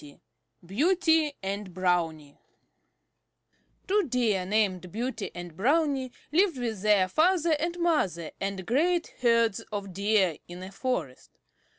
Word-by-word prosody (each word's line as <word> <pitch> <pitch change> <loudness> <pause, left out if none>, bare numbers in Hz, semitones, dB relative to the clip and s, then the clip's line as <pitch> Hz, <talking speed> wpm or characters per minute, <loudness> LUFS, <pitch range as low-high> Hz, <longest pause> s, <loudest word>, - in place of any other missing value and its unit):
XX 145 -1 -14 0.5
BEAUTY 320 - +2
AND 195 -2 -4
BROWNIE 165 -5 -1 1.5
Two 415 +2 +3
Deer 220 -7 +1
named 190 -4 0
Beauty 230 0 -3
and 175 -2 -8
Brownie 270 - +1 0.2
lived 345 -1 +3
with 230 -5 -3
their 205 -3 +4
father 330 - +3
and 340 +3 -2
mother 245 - 0
and 195 -1 -3
great 335 - +1
herds 230 -3 +3
of 200 -2 -5
Deer 200 -4 +1
in 175 +1 -9
a 190 - -8
forest. 200 - -4
215 Hz, 120 wpm, -28 LUFS, 185-300 Hz, 1.5 s, their